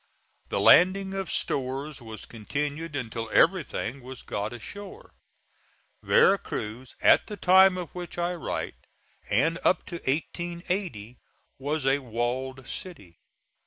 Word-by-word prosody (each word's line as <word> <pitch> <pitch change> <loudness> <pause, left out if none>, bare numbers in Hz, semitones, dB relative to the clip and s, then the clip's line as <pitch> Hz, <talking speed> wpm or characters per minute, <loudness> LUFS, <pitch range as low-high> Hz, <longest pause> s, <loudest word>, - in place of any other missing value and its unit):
The - - 0
landing 190 +2 +6
of 195 -2 -3
stores 135 +2 -2
was 110 -2 -9
continued 145 +7 -4
until 115 -4 -4
everything 140 - +2
was 130 0 -10
got 105 +1 -3
ashore. 205 - -9 0.9
Vera 195 +1 +5
Cruz, 115 +4 -6
at - - +5
the 210 - -6
time 190 0 +6
of 175 -4 -5
which 175 -1 -7
I 175 +1 0
write 170 - -5 0.4
and 160 - +2
up 180 - +2
to 170 - -6
1880, 170 - -3 0.4
was 145 +1 -2
a 135 +1 +3
walled 130 +2 -3
city. 100 - -8
145 Hz, 125 wpm, -27 LUFS, 125-180 Hz, 0.9 s, landing